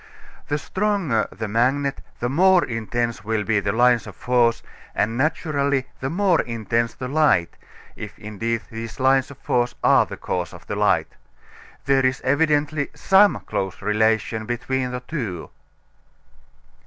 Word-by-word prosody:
The 145 - 0
stronger 185 - 0
the 110 +3 -5
magnet 135 +6 0 0.2
the 120 - 0
more 180 +6 +4
intense 115 -2 -3
will 110 0 -1
be 110 -1 +1
the 100 0 -1
lines 120 +2 +3
of - - -10
force, 120 -2 +1 0.3
and 110 +3 0
naturally 140 -1 0
the 135 - -3
more 185 +1 +2
intense 115 0 -2
the 130 - -5
light, 145 - +2 0.4
if - - -8
indeed 115 +2 -3
these 115 +1 -7
lines 130 0 +3
of 140 - -12
force 120 0 0
are - - +5
the - - -8
cause 90 -2 -3
of - - -14
the - - -4
light. - - +1 0.7
There 135 0 +3
is 130 0 +1
evidently 145 +1 +1
some 195 +1 +4
close 95 -1 -4
relation 110 +1 +1
between 125 +1 -2
the 125 0 -5
two. 115 - -5
125 Hz, 145 wpm, -22 LUFS, 115-145 Hz, 0.7 s, are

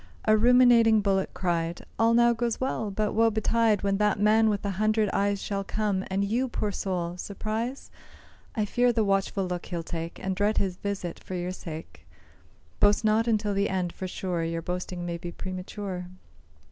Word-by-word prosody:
A 215 - +5
ruminating 235 -1 +6
bullock 195 -1 +1
cried, 170 -2 -2
"All 230 +1 +4
now 235 0 +5
goes 235 0 -2
well; 260 -5 -1
but 210 +1 -1
woe 225 +1 +4
betide 220 -1 +1
When 195 0 +1
that 210 -1 +1
man 220 +1 +4
with 205 -1 -1
the 200 - -1
hundred 215 +1 +1
eyes 200 0 +1
Shall 200 -1 -2
come, 205 -2 -1
and 195 +1 0
you, 240 +6 0
poor 215 -4 -2
soul! 180 -3 -3
surprise? 220 +7 -4 0.6
I 215 -3 +1
fear 245 +3 +2
the 225 -2 +1
watchful 195 -1 0
look 180 -1 -4
he'll 170 -2 -4
take, 165 0 -5
And 190 0 -3
dread 205 +3 +1
his 185 -2 0
visit 195 -4 -4
for 185 - -6
your 180 0 -2
sake; 160 -3 -9 0.7
Boast 205 +2 +4
not 220 +2 +3
until 215 -2 +1
the 200 +1 +1
end, 180 -2 -1
for 185 - -5
sure 180 -2 -3
Your 165 0 -3
boasting 180 0 -4
may 170 -1 -4
be 175 0 -6
premature." 185 0 -6
200 Hz, 185 wpm, -27 LUFS, 185-220 Hz, 0.7 s, ruminating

